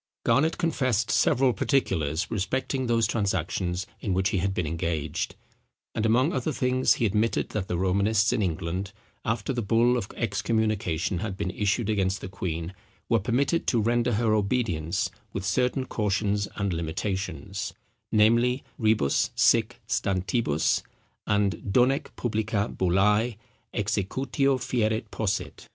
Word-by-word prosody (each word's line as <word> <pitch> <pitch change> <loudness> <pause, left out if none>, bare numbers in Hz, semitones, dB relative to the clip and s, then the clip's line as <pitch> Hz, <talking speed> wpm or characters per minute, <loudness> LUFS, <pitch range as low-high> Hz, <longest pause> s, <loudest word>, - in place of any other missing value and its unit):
Garnet 140 +8 +2
confessed 130 - 0
several 125 +5 +3
particulars 85 - 0
respecting 130 +5 -1
those 115 -1 +3
transactions 95 -3 -1
in 95 -4 -1
which 95 +2 +2
he 100 - 0
had 95 +3 0
been 90 -3 -1
engaged; 80 -1 -2 0.6
and 110 0 0
among 130 +9 +3
other 130 +3 -1
things 130 -1 +2
he 120 - 0
admitted 105 +2 +1
that 105 -3 -3
the 90 - -1
Romanists 100 +4 +2
in - - 0
England, 90 +1 -2 0.3
after 110 +2 -1
the 120 - -1
bull 115 +3 +3
of 100 - -3
excommunication 105 -5 0
had 100 -2 -4
been 90 - -2
issued 105 +3 0
against 100 -2 0
the - - -6
queen, 85 -2 -4 0.4
were 115 - +4
permitted 130 - 0
to 120 - +3
render 120 +2 +1
her 110 0 +2
obedience 100 -5 0 0.2
with 95 -1 -3
certain 125 +6 +1
cautions 105 -2 0
and 100 -3 -1
limitations, 95 +2 -3 0.4
namely, 115 +4 +3 0.2
Rebus 110 - +2
sic 115 +1 +3
stantibus, 95 - +1 0.5
and 105 -1 +2
Donec 125 +6 +3
publica 110 -3 -1
bullæ 105 +5 +2 0.3
executio 125 +7 0
fieret 110 -3 -1
posset. 105 -3 -3
105 Hz, 135 wpm, -26 LUFS, 95-120 Hz, 0.6 s, were